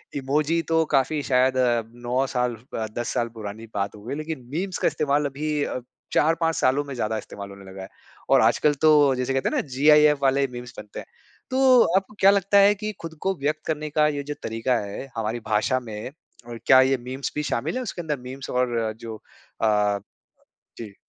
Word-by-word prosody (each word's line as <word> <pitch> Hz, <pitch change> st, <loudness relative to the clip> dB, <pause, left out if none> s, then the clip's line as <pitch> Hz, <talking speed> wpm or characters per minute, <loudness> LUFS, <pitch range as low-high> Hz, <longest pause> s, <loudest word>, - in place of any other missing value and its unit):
Emoji 150 Hz, +4 st, 0 dB
तो 165 Hz, 0 st, +1 dB
काफ़ी 145 Hz, +1 st, +1 dB
शायद 130 Hz, 0 st, +2 dB
अ, 120 Hz, -2 st, +2 dB
9 120 Hz, +3 st, -2 dB
साल 125 Hz, -2 st, -1 dB, 0.2 s
ब 110 Hz, -, -2 dB
10 120 Hz, -, -2 dB
साल 120 Hz, -1 st, -1 dB
पुरानी 110 Hz, +1 st, -7 dB
बात 100 Hz, +1 st, -2 dB
हो 105 Hz, -, -13 dB
गई। 130 Hz, +5 st, -4 dB
लेकिन 155 Hz, -4 st, -6 dB
मीम्स 185 Hz, +3 st, -2 dB
का -, -, +1 dB
इस्तेमाल 145 Hz, 0 st, +1 dB
अभी 145 Hz, +1 st, -2 dB
अ, 125 Hz, -, -3 dB, 0.3 s
4-5 165 Hz, +1 st, +2 dB
सालों 135 Hz, +3 st, +2 dB
में 140 Hz, -1 st, -7 dB
ज़्यादा 110 Hz, -2 st, -1 dB
इस्तेमाल 100 Hz, -1 st, -8 dB
होने 100 Hz, 0 st, -12 dB
लगा 95 Hz, 0 st, -9 dB
है। 95 Hz, -, -7 dB, 0.4 s
और 135 Hz, -3 st, +6 dB
आजकल 120 Hz, +6 st, +3 dB
तो 145 Hz, -4 st, +5 dB
जैसे 125 Hz, +1 st, -1 dB
कहते 135 Hz, -, 0 dB
हैं -, -, -3 dB
ना, -, -, +2 dB
जीआईएफ 150 Hz, +2 st, +4 dB
वाले 135 Hz, 0 st, +3 dB
मीम्स 120 Hz, 0 st, -8 dB
बनते 105 Hz, -1 st, -8 dB
हैं। -, -, -9 dB, 0.5 s
तो 260 Hz, -2 st, +5 dB, 0.2 s
आपको 195 Hz, +2 st, -3 dB
क्या 195 Hz, +1 st, +7 dB
लगता 200 Hz, 0 st, +2 dB
है 200 Hz, +1 st, +6 dB
कि 215 Hz, +1 st, -4 dB
खुद 165 Hz, -1 st, -7 dB
को 195 Hz, 0 st, +1 dB
व्यक़्त 150 Hz, +2 st, -2 dB
करने 155 Hz, -1 st, -2 dB
का 150 Hz, +1 st, +3 dB
ये 145 Hz, -1 st, -2 dB
जो 145 Hz, +1 st, -5 dB
तरीका 115 Hz, +3 st, -1 dB
है 100 Hz, +6 st, -6 dB
हमारी 115 Hz, +1 st, -2 dB
भाषा 110 Hz, +4 st, +1 dB
में 110 Hz, +1 st, -7 dB, 0.4 s
और 120 Hz, -1 st, -7 dB
क्या 130 Hz, -1 st, +7 dB
ये 135 Hz, 0 st, +3 dB
मीम्स 130 Hz, +3 st, -5 dB
भी 150 Hz, -, -1 dB
शामिल 135 Hz, -, -2 dB
है 255 Hz, -, -1 dB
उसके 185 Hz, -5 st, -5 dB
अंदर? 150 Hz, -4 st, -3 dB
मीम्स 130 Hz, +2 st, -8 dB
और 120 Hz, -3 st, 0 dB
जो 115 Hz, -1 st, -7 dB, 0.5 s
अ 105 Hz, -2 st, +2 dB, 0.8 s
जी। 105 Hz, -4 st, -9 dB
135 Hz, 205 wpm, -24 LUFS, 115-150 Hz, 0.8 s, क्या